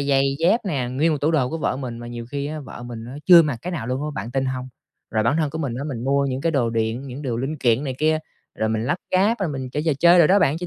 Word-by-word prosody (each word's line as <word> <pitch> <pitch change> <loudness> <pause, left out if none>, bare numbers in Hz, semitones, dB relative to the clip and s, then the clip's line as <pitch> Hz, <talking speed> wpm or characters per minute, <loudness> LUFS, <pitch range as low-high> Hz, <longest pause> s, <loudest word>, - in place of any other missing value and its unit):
giày 140 -1 +2 0.2
dép 180 +8 +3
nè, 135 -9 -1
nguyên 155 +5 +2
một 150 - -1
tủ 150 +3 +2
đồ 135 -6 +2
của 165 - -3
vợ 140 - -1
mình, 125 -4 -5
mà 120 - -8
nhiều 120 -1 -7
khi 140 0 -3
á 155 +1 -5
vợ 130 -3 -10
mình 115 -2 -7
á 130 +3 -8
chưa 175 -2 +9
mặc 145 -6 -1
cái 180 - -4
nào 145 -10 -4
luôn 130 +3 -2
á. 150 - -2
Bạn 120 - -5
tin 135 +1 0
hông? 130 0 -3 0.4
Rồi 110 - +1
bản 115 +7 +2
thân 155 -3 0
của 160 - -5
mình 140 -7 -2
á, 140 - -4
mình 125 -5 -4
mua 140 +1 +2
những 130 0 -2
cái 165 +1 0
đồ 120 -5 +1
điện, 115 +4 -2
những 130 +3 -7
đồ 125 -5 -2
linh 135 +6 -3
kiện 125 +1 +2
này 130 -2 -3
kia, 155 0 +2 0.4
rồi 110 - -1
mình 110 +1 -1
lắp 175 - +1 0.2
ráp 205 +5 +3
rồi 185 - 0
mình 130 -3 -5
chơi 150 +3 -2
trò 160 - +4
chơi 175 +2 +6
đồ 165 - +7
đó 200 +2 +5
bạn. 150 -1 +2
Cho 175 - -5
140 Hz, 320 wpm, -22 LUFS, 125-155 Hz, 0.4 s, chưa